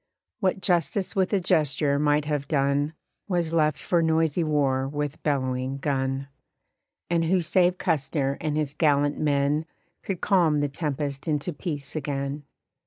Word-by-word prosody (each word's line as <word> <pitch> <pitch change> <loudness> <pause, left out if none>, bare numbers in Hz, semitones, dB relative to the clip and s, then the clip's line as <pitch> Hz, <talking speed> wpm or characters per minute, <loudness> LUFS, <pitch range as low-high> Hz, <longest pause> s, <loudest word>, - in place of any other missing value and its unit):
What 190 -2 0
Justice 180 +1 0
with 190 -1 +1
a 200 - +3
gesture 145 -4 +2
might 150 0 +2
have 145 -2 -2
done 145 +1 +1 0.3
Was 175 -4 0
left 155 -2 +2
for 170 -2 +1
noisy 160 0 +2
war 140 -4 +1
with 145 +1 -4
bellowing 130 -2 -1
gun. 135 -1 -1 0.8
And 165 -1 +2
who 185 +3 +3
save 180 +1 +2
Custer 140 -3 0
and 150 -1 -1
his 150 -2 -1
gallant 145 -2 +2
men 145 +1 +1 0.3
Could 190 -3 -4
calm 170 -7 +3
the 145 - 0
tempest 145 0 -3
into 155 +2 -1
peace 145 -2 -5
again? 140 -1 -3
150 Hz, 145 wpm, -26 LUFS, 140-165 Hz, 0.8 s, a